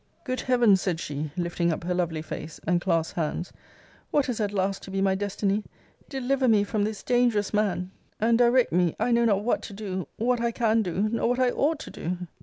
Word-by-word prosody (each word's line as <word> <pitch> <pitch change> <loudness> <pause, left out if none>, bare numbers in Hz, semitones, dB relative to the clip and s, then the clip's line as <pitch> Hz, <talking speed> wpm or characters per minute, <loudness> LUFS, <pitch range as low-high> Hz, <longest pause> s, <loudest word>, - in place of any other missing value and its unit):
Good 255 -1 -2
heaven! 240 -6 +4
said 180 -3 -2
she, 150 -1 -4
lifting 170 -1 0
up 160 - -3
her 180 +1 -1
lovely 165 -3 -1
face, 160 0 -7
and 175 +1 +2
clasped 165 -3 0
hands, 170 +2 -2 0.6
what 285 -3 +1
is 235 - -2
at 205 -2 0
last 195 -1 -1
to - - -10
be 195 0 -2
my 195 0 +3
destiny? 200 +1 -1 0.5
Deliver 265 0 0
me 215 -3 +5
from 205 0 0
this 215 -1 -4
dangerous 240 -5 +2
man; 195 -3 0 0.3
and 230 +2 +3
direct 245 +1 +4
me 175 -2 +2
I 245 - +1
know 235 0 +4
not 205 -3 +2
what 240 - +1
to 205 - -8
do, 190 -3 -4
what 240 +1 +1
I 235 - +2
can 225 -1 +2
do, 195 +1 0
nor 230 0 +1
what 245 +1 0
I 255 -1 +3
ought 305 +5 +1
to - - -8
do! 175 +2 -4
205 Hz, 215 wpm, -26 LUFS, 180-235 Hz, 0.6 s, me